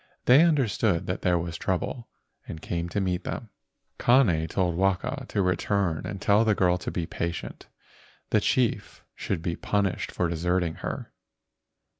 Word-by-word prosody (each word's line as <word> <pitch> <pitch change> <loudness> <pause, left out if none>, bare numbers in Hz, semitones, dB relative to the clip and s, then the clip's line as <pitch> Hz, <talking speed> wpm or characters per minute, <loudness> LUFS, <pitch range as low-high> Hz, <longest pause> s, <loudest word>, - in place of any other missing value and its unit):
They 130 +5 +7
understood 115 - +2
that 90 - -3
there 90 -1 +2
was 85 -1 -4
trouble, 95 +6 -3 0.4
and 80 - -7
came 85 +1 -3
to 100 - -1
meet 90 -2 -1
them. 110 - -5 0.5
Kane 105 -11 +4
told 90 +1 0
Waka 95 +9 -1
to 100 - 0
return 90 -2 0
and 100 -2 -5
tell 100 +3 +4
the 110 -2 +2
girl 90 -1 +2
to - - -4
be 85 - -2
patient; 85 +1 -5 0.6
the - - +3
chief - - 0
should 85 -4 -3
be 85 -1 -1
punished 100 0 -1
for 90 - 0
deserting 85 0 0
her. - - -5
90 Hz, 155 wpm, -26 LUFS, 85-105 Hz, 0.6 s, They